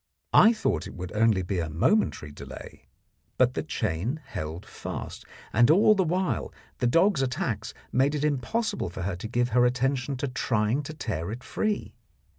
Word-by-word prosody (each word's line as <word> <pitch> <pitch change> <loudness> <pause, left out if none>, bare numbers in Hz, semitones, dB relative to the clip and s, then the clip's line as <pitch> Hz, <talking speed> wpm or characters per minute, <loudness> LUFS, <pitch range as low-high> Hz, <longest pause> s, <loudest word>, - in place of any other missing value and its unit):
I 220 - +8
thought 105 - -1
it - - -10
would 90 -1 -6
only 110 -3 +3
be 90 0 -2
a 80 -2 -2
momentary 80 - +1
delay, 70 - -11 0.5
but - - +4
the - - -1
chain 105 - -2
held 80 - -6
fast, - - -7 0.3
and 120 +4 +5
all 205 +6 +6
the 195 -2 +2
while 180 +2 -1 0.3
the 125 - +2
dog's 170 +4 +3
attacks 130 - -2 0.2
made 135 +4 +2
it 150 0 0
impossible 200 - -1
for 90 +1 -6
her 95 0 -2
to 105 - -6
give 120 +2 0
her 120 +1 +4
attention 130 +2 0
to 140 - -2
trying 120 0 0
to 155 - -7
tear 105 - -3
it 120 +3 -7
free. 215 -1 -2
125 Hz, 175 wpm, -27 LUFS, 100-155 Hz, 0.5 s, I